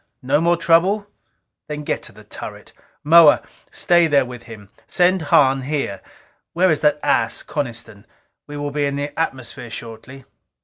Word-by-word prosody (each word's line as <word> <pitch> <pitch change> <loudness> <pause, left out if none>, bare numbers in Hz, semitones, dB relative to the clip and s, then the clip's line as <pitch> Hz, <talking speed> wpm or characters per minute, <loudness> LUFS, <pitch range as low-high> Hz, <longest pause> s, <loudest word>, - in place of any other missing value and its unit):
No 145 +4 +1
more 170 +1 +2
trouble? 175 +5 +2 0.6
Then 150 0 -6
get - - -1
into - - -16
the - - -15
turret. - - -10 0.3
Moa, 160 0 +6 0.3
stay 175 -1 +2
there 140 -3 +3
with 125 -1 -9
him. 105 -3 -12 0.2
Send 180 0 +2
Hahn 135 -1 +4
here. 135 -8 -3 0.5
Where 185 +1 +3
is 155 - 0
that 150 0 +2
ass, 115 - 0
Coniston? 115 -7 -6 0.4
We 145 0 -8
will 145 0 -4
be 145 0 -1
in 140 - -3
the 145 +1 -4
atmosphere 130 -6 -4
shortly." 115 +3 -10
145 Hz, 160 wpm, -20 LUFS, 125-165 Hz, 0.6 s, Moa